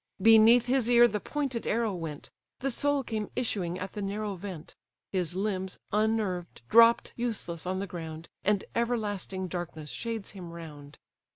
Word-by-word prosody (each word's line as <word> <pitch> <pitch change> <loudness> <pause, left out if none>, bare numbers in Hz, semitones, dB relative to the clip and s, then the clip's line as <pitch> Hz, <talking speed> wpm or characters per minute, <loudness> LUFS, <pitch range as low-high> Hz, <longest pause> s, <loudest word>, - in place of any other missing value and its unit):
Beneath 225 +3 +7
his 250 -1 +2
ear 240 0 +7
the 210 -2 -2
pointed 270 -2 -3
arrow 225 -2 +1
went; 160 -5 -6 0.3
The 270 +1 0
soul 285 +2 +1
came 215 -4 -3
issuing 190 -8 -1
at 185 +1 -5
the 210 - -5
narrow 205 +1 -2
vent: 185 -4 -8 0.4
His 180 -2 -1
limbs, 190 -1 -2
unnerved, 210 - 0
drop 230 +1 +6
useless 210 -8 -3
on 185 +1 -1
the 195 - -2
ground, 165 -3 -7 0.2
And 205 -1 +2
everlasting 205 -5 -1
darkness 170 -4 -5
shades 225 -3 -4
him 185 -4 -9
round. 150 -4 -10
205 Hz, 155 wpm, -29 LUFS, 180-230 Hz, 0.4 s, Beneath